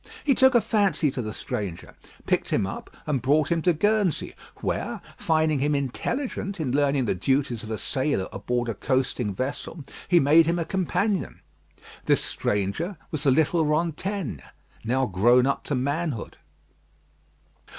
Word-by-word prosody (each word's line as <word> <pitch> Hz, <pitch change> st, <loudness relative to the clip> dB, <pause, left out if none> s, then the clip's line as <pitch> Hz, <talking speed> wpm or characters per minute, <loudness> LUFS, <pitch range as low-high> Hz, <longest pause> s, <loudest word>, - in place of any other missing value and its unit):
He 280 Hz, -, +4 dB
took 265 Hz, 0 st, +5 dB
a 240 Hz, -, +6 dB
fancy 200 Hz, -8 st, +2 dB
to 130 Hz, -, -3 dB
the 110 Hz, -2 st, -4 dB
stranger, 105 Hz, -7 st, -5 dB, 0.3 s
picked -, -, 0 dB
him -, -, +1 dB
up, 95 Hz, -, -6 dB, 0.2 s
and 145 Hz, -5 st, 0 dB
brought 145 Hz, +6 st, +2 dB
him 170 Hz, -1 st, +2 dB
to 180 Hz, -, +3 dB
Guernsey, 205 Hz, 0 st, +1 dB, 0.2 s
where, -, -, -3 dB, 0.2 s
finding 155 Hz, -2 st, +1 dB
him 145 Hz, +2 st, +1 dB
intelligent 195 Hz, -, -3 dB
in 145 Hz, -6 st, -1 dB
learning 140 Hz, -1 st, +2 dB
the -, -, +1 dB
duties 130 Hz, +4 st, 0 dB
of 110 Hz, -, -9 dB
a 110 Hz, -, -2 dB
sailor 130 Hz, -4 st, -1 dB
aboard 120 Hz, +4 st, -2 dB
a 115 Hz, -, -1 dB
coasting 130 Hz, -1 st, -1 dB
vessel, 135 Hz, -, -4 dB, 0.2 s
he 175 Hz, -, +5 dB
made 155 Hz, +3 st, +5 dB
him 170 Hz, +1 st, +1 dB
a 165 Hz, -, -1 dB
companion. 190 Hz, +2 st, -1 dB, 0.7 s
This -, -, +3 dB
stranger 105 Hz, -, -2 dB
was 155 Hz, -, -2 dB
the -, -, +6 dB
little 160 Hz, +4 st, +3 dB
Rantaine, 160 Hz, -, -1 dB, 0.4 s
now 130 Hz, +4 st, +1 dB
grown 120 Hz, +5 st, +4 dB
up 140 Hz, -, -1 dB
to 145 Hz, -, -1 dB
manhood. 140 Hz, -1 st, -2 dB
145 Hz, 155 wpm, -25 LUFS, 125-170 Hz, 0.7 s, a